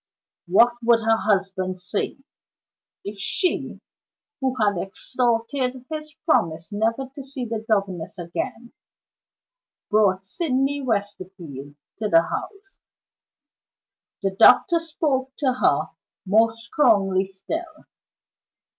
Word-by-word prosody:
What 235 +7 +5
would 230 -1 +4
her 225 0 +3
husband 190 -3 -1
say, 180 +3 -3 0.9
if 200 0 -7
she 360 - -1 0.6
(who 265 -1 -1
had 205 -6 +1
extorted 250 +4 -1
his 305 0 -5
promise 170 - +1
never 230 +5 -1
to 275 - -8
see 270 -1 -3
the 225 -1 -3
governess 195 -3 -1
again) 180 +7 -5 1.2
brought 195 -3 +3
Sydney 275 - -1
Westerfield 185 - -4
back 145 - -60
to 215 -1 -1
the 165 -2 +6
house? 395 - -7 1.4
The 195 - +1
doctor 335 - +6
spoke 285 -5 -2
to 265 -4 +1
her 255 - +1 0.4
more 220 +4 +4
strongly 205 -5 +2
still. 315 - -6
225 Hz, 105 wpm, -23 LUFS, 195-265 Hz, 1.4 s, the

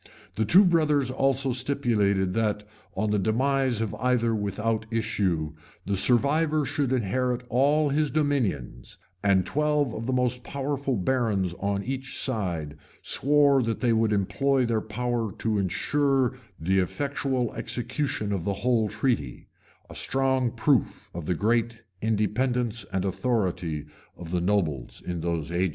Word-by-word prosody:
The 110 - +1
two 190 - +7
brothers 150 -6 +2
also 135 0 +1
stipulated, 110 -8 +1
that, 105 -1 0 0.3
on 105 +2 0
the 105 - +2
demise 130 +3 +1
of 110 -3 -2
either 125 -2 +2
without 110 +2 -1
issue, 95 -9 -1 0.3
the 100 - 0
survivor 145 - +2
should 140 -1 -1
inherit 125 +1 0
all 145 +4 +3
his 150 +1 +1
dominions; 115 - -1 0.2
and 95 -3 +3
twelve 150 -2 +1
of 115 +2 -5
the - - 0
most 125 -1 0
powerful 140 -2 -2
barons 100 -4 0
on 100 0 -1
each 135 +2 -4
side 85 - -2 0.3
swore 140 -1 +4
that 115 -2 -2
they 120 -2 +3
would 110 -1 +2
employ 130 +7 +1
their 115 -2 0
power 115 0 -2
to 110 -2 -1
insure 135 +7 +1 0.3
the 95 +4 +1
effectual 135 +3 -1
execution 120 -3 -2
of 95 -4 -1
the 100 - -1
whole 115 -4 +2
treaty,[*] 90 - -2 0.4
a - - -11
strong 130 -2 +1
proof 125 +3 0
of 85 -2 -6
the 90 - +1
great 115 +4 0 0.2
independence 115 +1 0
and 95 0 -1
authority 90 - -1 0.3
of 85 -1 -8
the 90 -1 0
nobles 85 -9 -1
in 90 -2 -3
those 85 -2 -2
ages. 90 +2 +1
115 Hz, 140 wpm, -26 LUFS, 100-135 Hz, 0.4 s, two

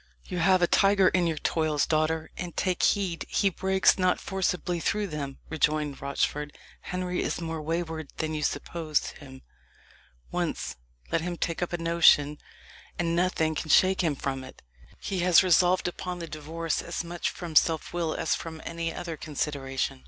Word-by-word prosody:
"You 180 - -4
have 185 +1 +4
a - - +5
tiger 195 0 +4
in 180 -2 +2
your 160 -2 -1
toils, 155 -1 +1
daughter, 155 0 0
and 175 -2 -6
take 185 -2 0
heed 190 -5 +1
he 200 -2 +2
breaks 190 +1 +3
not 185 0 +2
forcibly 180 -2 -1
through 210 +5 0
them," 145 -6 -5
rejoined 150 -2 0
Rochford. 145 +1 -2 0.2
"Henry 180 0 -3
is - - -2
more 165 -2 -4
wayward 160 -1 -3
than 155 0 -2
you 155 - -2
suppose 155 0 -1
him. 130 -3 -13 0.9
Once - - -2 0.4
let - - +1
him 175 +1 -3
take 165 0 -2
up 175 - -1
a 175 - -1
notion, 165 -3 +4 0.6
and 170 -1 0
nothing 170 -3 +1
can 155 - -4
shake 190 +4 +5
him 160 -5 +1
from 135 -1 -3
it. - - -13 0.4
He 195 -2 -3
has 180 +1 +6
resolved 180 0 +4
upon 180 0 -4
the 170 - -5
divorce 160 +2 -3
as - - -4
much 170 +1 -2
from 170 -3 -7
self 160 +1 +3
will 170 -2 -1
as 160 - 0
from 160 -1 -5
any 165 0 -3
other 170 -1 -5
consideration. 135 -3 -3
165 Hz, 170 wpm, -27 LUFS, 155-180 Hz, 0.9 s, has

